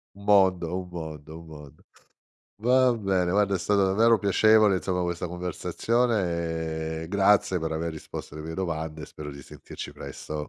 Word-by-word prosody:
Un 100 - -13
mondo, 95 -4 +3
un 90 -1 -7
mondo, 80 -2 -8
un 85 - -13
mondo. 75 -1 -13 0.8
Va 125 +1 +4
bene, 95 -5 0
guarda, 100 0 +2
è - - -2
stato 100 +2 +2
davvero 110 +4 +4
piacevole, 105 0 +4
insomma, 90 0 -2
questa 85 0 -3
conversazione 85 -4 -1
e 80 - -6
grazie 100 -2 +3
per 80 0 -3
aver 80 +1 -2
risposto 80 -1 -8
alle 75 0 -7
mie 80 - -5
domande 80 -4 -4
e - - -6
spero 75 -1 -9
di 70 0 -10
sentirci - - -9
presto. 75 - -8
90 Hz, 165 wpm, -26 LUFS, 80-100 Hz, 0.8 s, Va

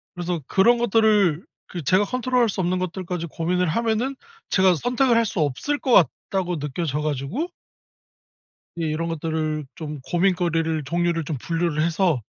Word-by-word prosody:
그래서 175 -2 -3
그런 235 +6 +4
것들을 215 -7 +3 0.2
그 175 -3 -6
제가 185 +8 +3
컨트롤 250 +2 0
할 230 - +3
수 190 - -2
없는 180 +1 0
것들까지 180 -1 -4
고민을 180 +4 0
하면은 230 +8 0 0.3
제가 185 -2 +4
'선택을 245 - +2
할 230 - +3
수 200 - -3
없을 155 - -1
것 260 - -2 0.4
같다.'고 180 -4 -1
느껴져 150 +1 -2
가지고 150 - -2 1.3
예 - - 0
이런 155 +2 -2
것들을 155 -2 -2
좀 150 -3 -6
고민거리를 170 -3 +1
종류를 170 +2 0
좀 145 -1 -3
분류를 165 0 -1
해서 165 - +1
175 Hz, 330 characters per minute, -23 LUFS, 160-205 Hz, 1.3 s, 그런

